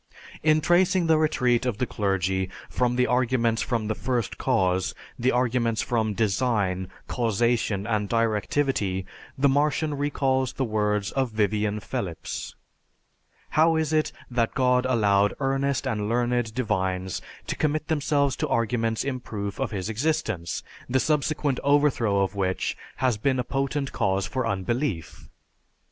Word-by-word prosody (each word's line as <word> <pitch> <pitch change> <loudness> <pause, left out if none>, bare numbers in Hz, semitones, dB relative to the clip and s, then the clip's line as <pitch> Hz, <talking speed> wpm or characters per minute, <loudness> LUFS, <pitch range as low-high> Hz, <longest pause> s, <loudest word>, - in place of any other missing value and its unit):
In 155 0 +4
tracing 175 +2 +3
the 160 -1 +4
retreat 125 -6 +2
of 125 -5 -1
the 125 - 0
clergy 95 -3 -1 0.2
from 125 -1 +1
the 125 0 +3
arguments 120 -3 +1
from 115 -3 -1
the 110 - 0
First 120 -1 -2
Cause, 95 -8 +1 0.2
the 125 +2 +2
arguments 120 -2 +1
from 110 -3 0
design, 100 -4 0 0.2
causation, 115 -3 0
and 105 -3 -1
directivity, 110 -3 0 0.3
the 140 +1 +4
Martian 150 +2 +1
recalls 135 -2 0
the 135 - -1
words 105 -2 0
of 135 -2 0
Vivian 105 -1 0
Phelips, 90 -5 -5 0.9
"How 160 +2 +4
is 160 -1 0
it 155 0 +2 0.2
that 115 -2 0
God 125 -1 +3
allowed 105 -5 +3
earnest 135 0 0
and 105 -1 -1
learned 120 -1 0
divines 95 -6 -1 0.2
to - - -3
commit 155 0 0
themselves 145 -3 +1
to - - -1
arguments 115 -1 0
in 135 -2 -2
proof 100 -4 -5
of 135 -3 0
His 100 -3 -4
existence, 110 - -1 0.3
the 130 +1 +2
subsequent 150 -2 0
overthrow 140 -8 +3
of 95 0 0
which 95 -2 -1 0.2
has 125 -4 +1
been 130 +4 +1
a 125 - 0
potent 135 +1 -2
cause 95 0 0
for 130 0 -2
unbelief?" 100 - -2
120 Hz, 140 wpm, -26 LUFS, 105-135 Hz, 0.9 s, In